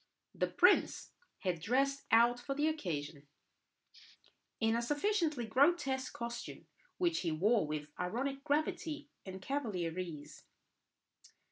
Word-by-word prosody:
The - - 0
prince - - +3 0.3
was 180 -3 0
dressed 275 - 0
out 235 +2 +5
for 275 +3 -4
the 295 +2 +2
occasion 150 - -3 1.3
in 225 0 +2
a 235 - +1
sufficiently 300 - 0
grotesque 265 +2 +2
costume, 235 0 -6 0.3
which 345 -2 +1
he 170 - -1
wore 200 +3 +2
with 150 -1 -4
ironic 265 +10 -2
gravity 300 0 -1 0.2
and 190 0 -6
cavalier 190 - -2
ease. 150 -5 -7
240 Hz, 115 wpm, -34 LUFS, 180-285 Hz, 1.3 s, out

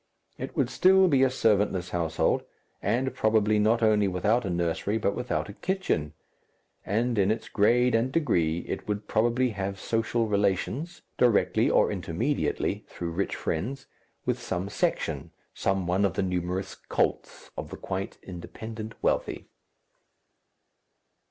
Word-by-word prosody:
It - - -5
would - - +1
still 190 0 +5
be 140 -6 +3
a 135 - +5
servantless 105 -7 +1
household, 85 -2 +1 0.4
and 125 +6 0
probably 110 -1 +2
not 115 +2 +3
only 105 -2 +4
without 105 +6 +1
a - - -2
nursery 85 +4 0
but 100 -2 0
without 125 0 -2
a 100 - -8
kitchen, 145 - -1 0.7
and 115 +2 0
in 95 0 +3
its 110 - -1
grade 120 +4 +3
and 115 +3 +2
degree 85 - +1
it - - -4
would 105 0 -3
probably 120 +3 +2
have 100 -1 -4
social 115 +2 0
relations 105 - -1 0.2
directly 120 -4 +3
or - - +3
intermediately - - -1
through 85 -1 -5
rich 95 +4 -1
friends 130 +12 -3 0.4
with - - -1
some 90 +2 -3
section, 80 -5 -1 0.2
some 95 -1 0
one 90 +3 +1
of 95 -4 +1
the - - +1
numerous 90 +1 -2
cults - - -2
of - - -6
the - - -7
quite 95 +1 -4
independent 110 +5 -7
wealthy. - - -1
105 Hz, 140 wpm, -27 LUFS, 95-120 Hz, 0.7 s, still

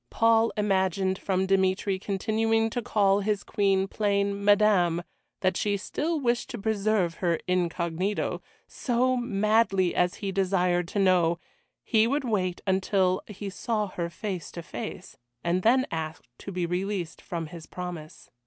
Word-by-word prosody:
Paul 225 0 +3
imagined 190 -2 +1
from 190 -1 0
Dmitry 190 0 +1
continuing 225 +3 0
to 245 - -2
call 200 -3 +2
his 205 0 -1
Queen 195 -2 +1
plain 200 -1 0
"Madame" 200 -5 +4 0.4
that 185 -1 +2
she 205 -1 0
still 310 - -2
wished 240 -3 0
to 240 - -5
preserve 205 -5 0
her 170 -3 +1
incognito, 180 +2 -1 0.3
so, 255 +1 +1
madly 215 -5 +2
as 180 0 +1
he 200 -2 -4
desired 180 -2 +1
to 195 - -5
know, 180 -4 +3 0.5
he 220 -1 +3
would 280 +3 0
wait 185 -7 -1
until 190 -1 +2
he 205 -1 -6
saw 215 +1 -2
her 170 -2 -3
face 185 0 -5
to 170 - -6
face, 190 0 -7 0.3
and 175 +2 +1
then 255 +6 +4
ask 160 -1 -4 0.2
to 200 - -7
be 180 -2 -1
released 180 0 -3
from 170 -2 -4
his 160 +1 -10
promise. 175 -4 -8
195 Hz, 145 wpm, -27 LUFS, 180-215 Hz, 0.5 s, Madame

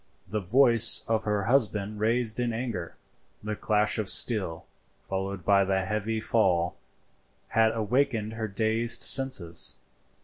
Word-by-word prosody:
The 105 +3 -3
voice 115 +3 +6
of 110 -1 -1
her 105 -1 -1
husband 105 -4 0
raised 115 +1 0
in 120 -1 -2
anger, 110 -8 -6 0.5
the 105 0 -4
clash 105 +1 -1
of 105 - -3
steel, 95 -9 +1 0.4
followed 95 -1 -5
by 100 -1 +3
the 95 0 -1
heavy 105 +2 -3
fall, 90 -6 0 0.7
had 110 0 +2
awakened 115 0 -1
her 110 -1 -5
dazed 110 +3 -2
senses. 130 - +1
110 Hz, 130 wpm, -26 LUFS, 100-115 Hz, 0.7 s, voice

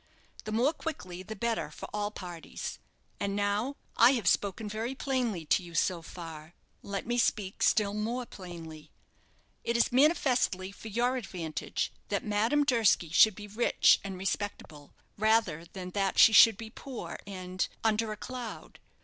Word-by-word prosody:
The 215 - -4
more 245 +8 +2
quickly 185 - -6
the 220 +4 -7
better 225 -6 -1
for - - -9
all 205 0 -1
parties. 175 -5 -7 0.4
And 200 0 -1
now, 205 +7 0 0.2
I 240 +3 +7
have 230 -8 -1
spoken 200 +3 +1
very 225 +5 -3
plainly 245 - -1
to 170 - +3
you 170 -1 -11
so 175 0 +1
far, 165 -1 -9 0.3
let 200 -1 -4
me 240 +1 0
speak 200 -4 0
still 205 -2 +3
more 230 +4 -2
plainly. 165 -6 -10 0.7
It 235 0 0
is 235 - +3
manifestly 250 - +2
for 210 - -11
your 240 +4 +1
advantage 165 - -4 0.2
that 200 - -1
Madame 225 +8 +2
Durski 230 - +3
should 205 +4 +6
be 210 - -8
rich 215 +4 +4
and 195 -2 -5
respectable, 185 -6 -4 0.2
rather 215 -7 +2
than 180 +1 -8
that 195 0 0
she 225 - +8
should 225 -1 +8
be 220 0 -8
poor 260 0 -7
and 185 -1 -3 0.2
under 220 0 +1
a 215 - -5
cloud. 250 0 -7
210 Hz, 160 wpm, -30 LUFS, 185-235 Hz, 0.7 s, she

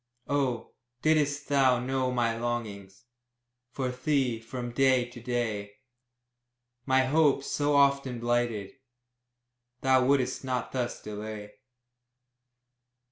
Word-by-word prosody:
Oh, 135 -5 -1 0.3
didst 145 -2 +2
thou 135 -3 +4
know 130 +1 -1
my 120 -2 +1
longings 115 -4 -5 0.6
For 130 +1 -3
thee, 130 -2 0
from 120 +1 -6
day 130 0 +3
to 120 0 -12
day, 110 -4 -2 1.1
My 130 0 +4
hopes, 140 -1 +3
so 145 0 +1
often 140 -3 +3
blighted, 120 -4 -1 1.1
Thou 130 -1 +4
wouldst 130 -1 +1
not 125 -2 -2
thus 125 -2 -3
delay! 105 0 -7
125 Hz, 100 wpm, -28 LUFS, 115-135 Hz, 1.1 s, thou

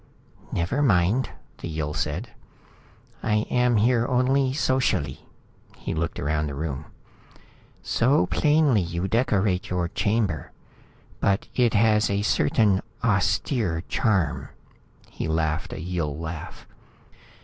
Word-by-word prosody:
"Never 90 +12 0
mind," 105 0 +3 0.3
the - - -5
Yill 75 -2 -3
said. - - -3 0.9
"I 105 0 +1
am 125 -1 +3
here 120 +2 +3
only 130 +1 +2
socially." 130 -2 0 0.5
He - - -4
looked 85 +1 -2
around 75 +1 0
the 70 - -5
room. 75 -1 -4 1.0
"So 120 -5 +2
plainly 145 - +3
you 85 +2 -2
decorate 100 -4 +1
your 90 -1 -1
chamber. 100 -6 -1 0.7
But 100 0 +1
it 120 -3 +2
has 105 0 +4
a 100 0 0
certain 100 +2 +2 0.2
austere 95 - +1
charm." 105 -8 0 0.6
He - - -4
laughed 80 0 -1
a - - -6
Yill 80 -3 -3
laugh. 80 0 -7
100 Hz, 115 wpm, -25 LUFS, 85-120 Hz, 1.0 s, has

